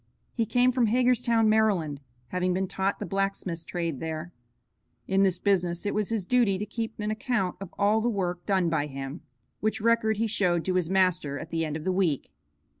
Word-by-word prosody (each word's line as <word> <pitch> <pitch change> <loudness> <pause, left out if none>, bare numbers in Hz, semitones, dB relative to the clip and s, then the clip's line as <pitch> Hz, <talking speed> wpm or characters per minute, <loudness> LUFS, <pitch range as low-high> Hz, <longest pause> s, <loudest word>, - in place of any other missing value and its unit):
He 230 -2 -1
came 250 +3 +3
from 250 -2 +2
Hagerstown, 245 -1 +3
Maryland, 195 -10 +2 0.3
having 180 0 0
been 190 +1 0
taught 190 +1 -1
the - - -5
blacksmith's 195 -4 -2
trade 170 -6 -3
there. 160 +1 -5 0.7
In 195 0 +2
this 190 -2 +3
business 180 -2 0
it 205 - 0
was 210 -2 -1
his 220 -5 -1
duty 235 -4 +3
to 210 - -3
keep 225 +1 -5
an 210 0 -1
account 215 -4 -1
of 195 -2 -7
all 210 +2 +3
the 240 - +1
work 180 -5 -2
done 190 -4 +2
by 155 -3 0
him, 135 +3 -6 0.4
which 215 +1 0
record 220 -1 +2
he 225 - +1
showed 180 -6 +1
to 185 - 0
his 180 -3 0
master 180 -6 +2
at 155 +2 -8
the 165 -1 0
end 155 -1 -2
of 155 - -8
the 185 - 0
week. 170 - 0
190 Hz, 200 wpm, -27 LUFS, 170-220 Hz, 0.7 s, came